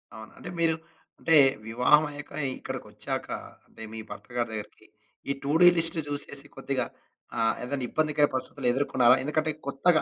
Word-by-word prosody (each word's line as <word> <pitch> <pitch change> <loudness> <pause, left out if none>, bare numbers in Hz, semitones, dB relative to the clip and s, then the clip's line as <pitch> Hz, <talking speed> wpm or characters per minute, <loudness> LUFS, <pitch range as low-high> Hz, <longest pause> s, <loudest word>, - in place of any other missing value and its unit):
అవును. 110 0 -11
అంటే - - -8
మీరు 165 -1 +3 0.4
అంటే 165 - +3 0.3
వివాహం 125 +7 +4
అయ్యాక 145 0 -9 0.3
ఇక్కడికొచ్చాక - - -5 0.4
అంటే, - - -15
మీ 110 - -6
భర్త - - -9
గారి 120 -1 0
దగ్గరికి. 105 -1 -8 0.4
ఈ - - +2
టూ 140 - -1
డు 175 - +9
లిస్ట్ 165 0 +7
చూసేసి 140 -1 -2
కొద్దిగా 135 -2 -2 0.5
ఆహ్, 115 0 +3
ఏదైనా 135 +1 -3
ఇబ్బందికర 150 -1 +2
పరిస్థితులు 130 0 -3
ఎదుర్కొన్నారా? 130 -2 +4
ఎందుకంటే, 155 +2 0 0.2
కొత్తగా 155 +4 +3
140 Hz, 150 wpm, -27 LUFS, 125-155 Hz, 0.5 s, డు